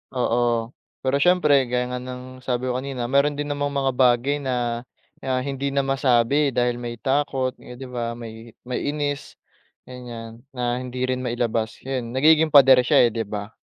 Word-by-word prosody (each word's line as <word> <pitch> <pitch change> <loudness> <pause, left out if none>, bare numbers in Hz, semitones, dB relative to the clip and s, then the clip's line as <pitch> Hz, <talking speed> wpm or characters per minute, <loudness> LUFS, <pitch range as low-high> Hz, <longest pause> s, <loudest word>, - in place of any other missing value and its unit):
Oo, 120 -1 0 0.3
pero 135 +2 +1
siyempre 150 -6 +4
gaya 125 0 0
nga 125 - -3
ng 130 0 -9
sabi 125 0 -2
ko 125 - -1
kanina, 130 -2 -4
meron 140 +1 +3
din 145 - -2
namang 145 0 -2
mga 135 -1 +1
bagay 130 +3 +2
na 120 -3 -2 0.4
na 130 -1 -1
hindi 140 0 -3
na 140 0 0
masabi 135 +1 +2
dahil 120 0 +1
may 120 -1 -5
takot 135 0 0
eh 125 - -11
'di 130 +1 -9
ba, 120 -1 -3
may 115 -1 -10
may 125 +3 -3
inis, 145 -1 -3 0.5
ganiyan 120 -2 -9 0.2
na 125 0 -1
hindi 125 0 -5
rin 130 0 -1
mailabas. 115 -2 -2
'Yun 130 -2 -4
nagiging 155 +3 +5
pader 135 -2 +8
siya - - +6
eh, 120 - +3
'di 115 -2 -3
ba. 105 0 -5
125 Hz, 175 wpm, -23 LUFS, 120-135 Hz, 0.5 s, pader